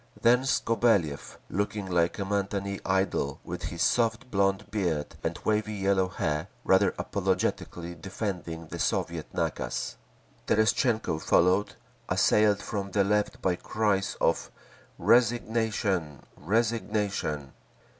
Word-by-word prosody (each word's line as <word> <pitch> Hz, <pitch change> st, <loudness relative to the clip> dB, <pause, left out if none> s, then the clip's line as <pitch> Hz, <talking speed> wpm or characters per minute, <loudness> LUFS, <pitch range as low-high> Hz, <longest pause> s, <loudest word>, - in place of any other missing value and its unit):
Then 125 Hz, +2 st, +4 dB
Skobeliev, 115 Hz, -, +1 dB
looking 100 Hz, +1 st, -2 dB
like 85 Hz, -2 st, +1 dB
a 100 Hz, -, -1 dB
matinée 100 Hz, 0 st, -2 dB
idol 95 Hz, -7 st, 0 dB
with -, -, -6 dB
his 85 Hz, -1 st, -2 dB
soft 120 Hz, +2 st, +1 dB
blond 100 Hz, +1 st, +1 dB
beard 85 Hz, -8 st, -1 dB
and -, -, -2 dB
wavy 105 Hz, 0 st, +1 dB
yellow 95 Hz, -1 st, +2 dB
hair, 75 Hz, -4 st, -2 dB, 0.2 s
rather 95 Hz, +1 st, +3 dB
apologetically 85 Hz, 0 st, -2 dB
defending 90 Hz, -4 st, -5 dB
the -, -, -7 dB
Soviet -, -, -1 dB
nakaz. -, -, -2 dB, 0.5 s
Terestchenko 110 Hz, -4 st, +2 dB
followed, 95 Hz, +4 st, +3 dB, 0.3 s
assailed 105 Hz, -1 st, +3 dB
from 100 Hz, -3 st, -3 dB
the 100 Hz, +1 st, +2 dB
Left 105 Hz, +1 st, 0 dB
by 90 Hz, -1 st, +2 dB
cries 100 Hz, -1 st, 0 dB
of -, -, +1 dB, 0.5 s
"Resignation! 110 Hz, -, +1 dB
Resignation!" 105 Hz, -, -1 dB
100 Hz, 110 wpm, -28 LUFS, 90-110 Hz, 0.5 s, Then